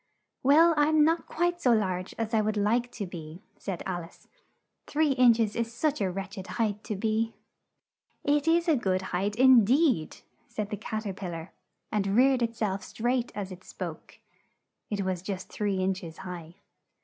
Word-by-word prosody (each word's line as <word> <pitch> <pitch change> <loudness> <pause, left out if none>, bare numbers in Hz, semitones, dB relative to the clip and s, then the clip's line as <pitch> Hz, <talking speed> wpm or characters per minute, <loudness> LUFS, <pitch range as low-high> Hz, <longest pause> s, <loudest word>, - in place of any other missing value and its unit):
"Well, 320 +5 +6
I'm 300 +1 +4
not 330 +1 +1
quite 350 +1 -1
so 250 -5 +4
large 185 -4 -1
as 225 0 -3
I 220 - +4
would 215 0 -1
like 235 +4 +1
to 205 - -4
be," 170 0 -9 0.2
said 190 -4 -4
Al 175 -2 -3
ice; 165 - -16 0.6
"three 300 0 +2
inch 250 -3 +5
es 215 -2 +1
is 230 -1 -1
such 295 +2 -1
a 190 - +1
wretch 195 +1 -5
ed 185 - -8
height 215 -2 0
to 210 - -3
be." 220 +2 -1 0.9
"It 290 +1 +2
is 335 +1 +3
a 320 - +5
good 190 -7 0
height, 200 +3 0
in 255 -1 +7
deed!" 255 - +2 0.3
said 210 -1 -5
the - - -1
Cat 220 +1 -4
er 195 - -2
pil 185 -2 -6
lar, 165 +2 -8 0.4
and 200 -2 0
reared 260 +1 +4
it 230 0 0
self 200 -4 -1
up - - -15
straight 245 +1 -1
as 200 -2 -4
it 185 0 -10
spoke. - - -8 0.7
(It 200 -2 -2
was 185 -2 -1
just 190 -1 -5
three 205 -2 -1
inch 185 0 -1
es 165 -1 -9
high.) 175 -3 -8
215 Hz, 195 wpm, -28 LUFS, 190-250 Hz, 0.9 s, in